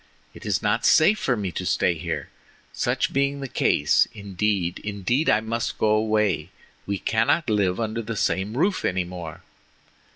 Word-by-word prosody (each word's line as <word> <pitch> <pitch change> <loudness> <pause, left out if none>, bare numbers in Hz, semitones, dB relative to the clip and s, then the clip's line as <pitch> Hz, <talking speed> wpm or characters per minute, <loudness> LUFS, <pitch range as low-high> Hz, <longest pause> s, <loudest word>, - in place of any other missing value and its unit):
It - - -10
is - - 0
not - - +1
safe 200 +7 +5
for 125 -3 0
me 100 -3 -3
to 90 - -4
stay 90 - +1
here, 80 - -5 0.4
such - - -1
being 140 +1 0
the 135 - -4
case; 75 - +2
indeed, 100 -3 -2
indeed, 105 - -1
I 110 - +4
must 115 +1 -3
go 110 - +2
away, 105 -6 +1 0.4
we 100 0 -1
cannot 115 - +1
live 95 -3 +1
under 115 0 -2
the 115 0 -5
same 100 +5 -1
roof 185 +6 +1
any 90 0 0
more." 85 -3 -8
105 Hz, 165 wpm, -24 LUFS, 95-115 Hz, 0.4 s, safe